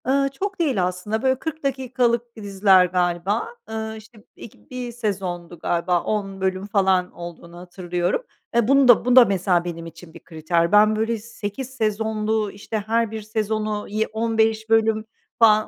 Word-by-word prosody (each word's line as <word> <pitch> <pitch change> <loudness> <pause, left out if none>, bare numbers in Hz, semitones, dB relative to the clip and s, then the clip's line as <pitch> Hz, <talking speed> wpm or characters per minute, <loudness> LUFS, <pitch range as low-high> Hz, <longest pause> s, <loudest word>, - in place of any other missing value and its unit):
Iıı, 275 +1 +2
çok 385 +8 -5
değil 270 - +1
aslında, 185 +5 -2
böyle 260 -1 +1
40 315 +1 -5
dakikalık 250 -3 -1
diziler 195 -3 +4
galiba. 180 +4 0 0.2
Iıı, 220 0 -4
işte 220 +1 -15
b - - -21
ilk 230 - -14
1 250 -1 -5
sezondu 185 -7 -4
galiba, 175 +1 0
10 195 -2 -3
bölüm 190 +1 -1
falan 190 -3 +2
olduğunu 170 0 -10
hatırlıyorum. 175 - -3 0.3
E 235 -2 +3
bunu 275 0 +5
da, 245 -1 +6
bu 250 0 +3
da 255 -2 +9
mesela 185 -3 +1
benim 165 -1 -5
için 165 0 -12
bir 170 - -13
kriter. 165 +2 -1
Ben 210 +1 +5
böyle 225 +1 0
8 225 +2 -6
sezonlu, 220 -3 -1
işte 205 +1 -5
her 230 0 +1
bir 220 -1 -5
sezonu 215 0 -2
yi 215 +2 -1
15 220 0 0
bölüm 225 -1 +2 0.3
falan 215 -2 +5
215 Hz, 165 wpm, -22 LUFS, 185-230 Hz, 0.3 s, da